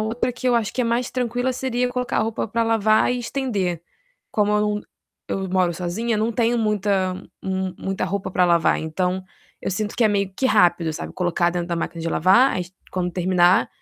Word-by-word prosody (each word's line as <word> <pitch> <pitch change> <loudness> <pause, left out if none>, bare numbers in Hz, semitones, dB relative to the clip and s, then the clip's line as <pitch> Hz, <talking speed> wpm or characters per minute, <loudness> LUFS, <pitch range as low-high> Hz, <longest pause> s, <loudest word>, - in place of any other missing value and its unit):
outra 230 +3 -1
que 250 +1 -2
eu 245 - +3
acho 225 -3 0
que - - -2
é 245 - +2
mais 235 +2 0
tranquila 245 0 -1
seria 250 -1 -1
colocar 250 0 -2
a - - +3
roupa 220 0 -2
para 230 +2 0
lavar 220 0 +3
e 250 - -2
estender. 210 - -2 0.5
Como 210 -1 +1
eu 210 - +3
num 210 0 0 0.5
eu 190 0 -2
moro 180 -2 +2
sozinha, 195 +7 -2
não 220 +2 0
tenho 235 +1 +1
muita 200 -4 +1 0.3
mu 190 -1 -2
muita 195 0 -2
roupa 195 -1 -3
para 180 0 +3
lavar, 170 -1 +3
então 180 +4 -2 0.4
eu - - -3
sinto 210 +3 -2
que 240 - +1
é - - +5
meio 200 -2 0
que 265 - +1
rápido, 175 -7 +3
sabe, - - -6
colocar 175 -1 +1
dentro 175 0 -3
da 170 - -1
máquina 165 0 -4
de 165 - -2
lavar, 190 +11 +4 0.3
quando 180 -1 -2
terminar, 180 0 +3
205 Hz, 205 wpm, -22 LUFS, 180-235 Hz, 0.5 s, é